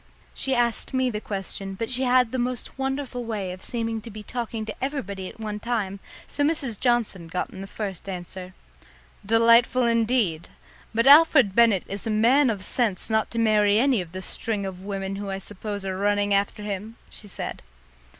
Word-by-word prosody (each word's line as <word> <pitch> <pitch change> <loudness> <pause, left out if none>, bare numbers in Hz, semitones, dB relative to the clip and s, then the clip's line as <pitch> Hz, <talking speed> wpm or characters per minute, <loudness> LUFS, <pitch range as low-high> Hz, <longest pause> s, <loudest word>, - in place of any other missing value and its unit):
She 270 -1 -1
asked 240 +1 0
me 260 -1 +1
the 210 -1 -4
question, 195 -1 -4
but 225 +5 -4
she 255 +1 0
had 250 -2 +3
the 260 - -2
most 250 +2 -3
wonderful 270 -2 -3
way 210 -5 -3
of 185 +1 -9
seeming 225 -1 -2
to 230 - -10
be 215 0 -9
talking 230 -1 -4
to 215 +3 -7
everybody 200 -10 -4
at - - -15
one 210 -1 -4
time, 210 -4 -2 0.3
so 290 - -2
Mrs. 285 -8 -1
Johnson 235 -8 0
got 180 +2 -3
in 190 - -9
the 195 - -7
first 195 -2 -6
answer. 185 0 -7 0.7
"Delightful 230 +4 +5
indeed! 230 -8 +1 0.4
But 230 +2 +1
Alfred 280 -7 +7
Bennett 225 -4 +4
is 200 +3 -4
a - - -1
man 240 +6 +4
of 205 -4 -2
sense 220 -2 0
not 220 0 +2
to 230 - -7
marry 210 -2 +4
any 250 -3 +3
of 170 -2 -9
the 185 +1 -6
string 210 +1 -2
of 185 -1 -6
women 195 0 -4
who 200 0 -5
I 195 - -2
suppose 205 +1 -5
are 190 -1 -2
running 205 +1 +1
after 200 +1 0
him!" 205 +2 -5 0.2
she 210 - -10
said. 195 - -6
215 Hz, 190 wpm, -25 LUFS, 195-240 Hz, 0.7 s, Alfred